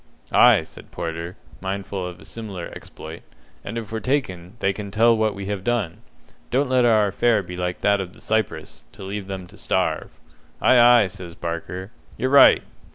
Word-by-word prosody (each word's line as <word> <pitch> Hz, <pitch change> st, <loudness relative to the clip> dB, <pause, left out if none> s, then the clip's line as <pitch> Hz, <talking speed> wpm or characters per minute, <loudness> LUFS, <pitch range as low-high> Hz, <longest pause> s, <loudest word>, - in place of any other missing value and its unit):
"Ay," -, -, +6 dB
said -, -, -14 dB
Porter, 85 Hz, +2 st, -5 dB, 0.2 s
mindful 95 Hz, -1 st, -4 dB
of 90 Hz, 0 st, -9 dB
a -, -, -14 dB
similar 100 Hz, -6 st, -7 dB
exploit, 80 Hz, +1 st, -10 dB, 0.4 s
"and 115 Hz, +4 st, -5 dB
if 110 Hz, -3 st, -6 dB
we're 110 Hz, -, -2 dB
taken, 105 Hz, -9 st, -2 dB
they 100 Hz, -3 st, +1 dB
can 100 Hz, 0 st, -6 dB
tell 115 Hz, +3 st, +4 dB
what 110 Hz, -1 st, 0 dB
we 100 Hz, 0 st, -6 dB
have 100 Hz, -1 st, -3 dB
done. 115 Hz, -8 st, -1 dB, 0.5 s
Don't 135 Hz, +2 st, +1 dB
let 125 Hz, -1 st, +4 dB
our 110 Hz, -3 st, +4 dB
affair 105 Hz, +2 st, +2 dB
be 90 Hz, 0 st, -8 dB
like 90 Hz, 0 st, -3 dB
that 100 Hz, -1 st, +3 dB
of 90 Hz, -1 st, -7 dB
the -, -, -16 dB
Cypress, 110 Hz, -2 st, -2 dB
to -, -, -11 dB
leave 100 Hz, 0 st, -5 dB
them 95 Hz, -2 st, -5 dB
to 90 Hz, -, -17 dB
starve." -, -, -1 dB, 0.5 s
"Ay, 120 Hz, -2 st, +6 dB
ay," -, -, 0 dB
says 90 Hz, -3 st, -8 dB
Barker, 90 Hz, +4 st, -5 dB, 0.3 s
"you're 130 Hz, -, -1 dB
right! 140 Hz, -, +7 dB
100 Hz, 185 wpm, -23 LUFS, 90-115 Hz, 0.5 s, right